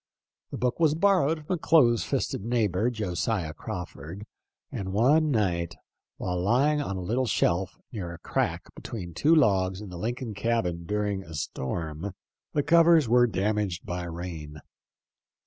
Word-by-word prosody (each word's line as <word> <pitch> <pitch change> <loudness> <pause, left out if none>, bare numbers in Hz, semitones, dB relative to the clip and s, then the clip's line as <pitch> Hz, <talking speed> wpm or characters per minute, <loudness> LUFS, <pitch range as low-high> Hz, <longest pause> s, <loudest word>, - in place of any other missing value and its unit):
The - - -5
book 125 +3 -1
was 155 -2 +4
borrowed 165 -4 +2
from 185 - -1
a 180 - -1
close 120 -9 +4
fisted - - -2
neighbor, 110 -2 +1
Josiah 95 -5 -2
Crawford, 90 0 -7 0.5
and 95 -1 -4
one 145 +9 +4
night, 90 - 0 0.4
while 90 -1 -2
lying 135 +9 +3
on 100 -9 -3
a - - -4
little 120 +8 0
shelf 90 -2 +1
near 95 -7 -5
a 85 - -8
crack - - -2
between 90 -7 -7
two 160 - +4
logs 95 - +3
in 105 -2 -8
the 90 -1 -8
Lincoln 120 +2 -3
cabin 100 -5 -1
during 105 -1 -1
a 80 -3 -10
storm, 80 +6 -4 0.4
the 145 - +1
covers 165 -3 +5
were 120 +1 +5
damaged 105 -3 -1
by 90 0 -4
rain. 85 -3 -6
105 Hz, 150 wpm, -27 LUFS, 90-125 Hz, 0.5 s, covers